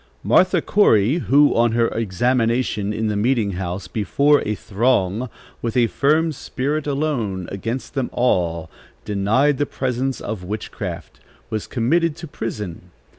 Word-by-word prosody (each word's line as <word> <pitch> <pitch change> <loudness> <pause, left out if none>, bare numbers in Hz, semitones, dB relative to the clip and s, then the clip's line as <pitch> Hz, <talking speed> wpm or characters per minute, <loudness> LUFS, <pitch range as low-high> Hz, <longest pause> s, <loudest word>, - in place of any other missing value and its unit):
Martha 185 0 +3
Corey, 130 - +3
who, 145 -1 +4
on 115 -1 +3
her 115 0 +3
examination 115 0 0
in 110 +1 -2
the 105 - -1
meeting 110 -1 +1
house, 90 0 -4
before 140 +8 +2
a 105 - 0
throng, 110 +1 0 0.3
with 115 0 -2
a 120 - +5
firm 150 +8 +2
spirit, 145 +1 -3
alone, 130 - -1
against 115 +6 -4
them 135 -3 -1
all, 85 -9 0 0.4
denied 110 +8 +2
the 145 - +1
presence 130 0 -2
of 105 -4 -5
witchcraft, 105 +4 -6 0.3
was 110 -1 -3
committed 160 +7 +1
to 165 +1 -8
prison. 105 - -6
115 Hz, 135 wpm, -21 LUFS, 105-140 Hz, 0.4 s, a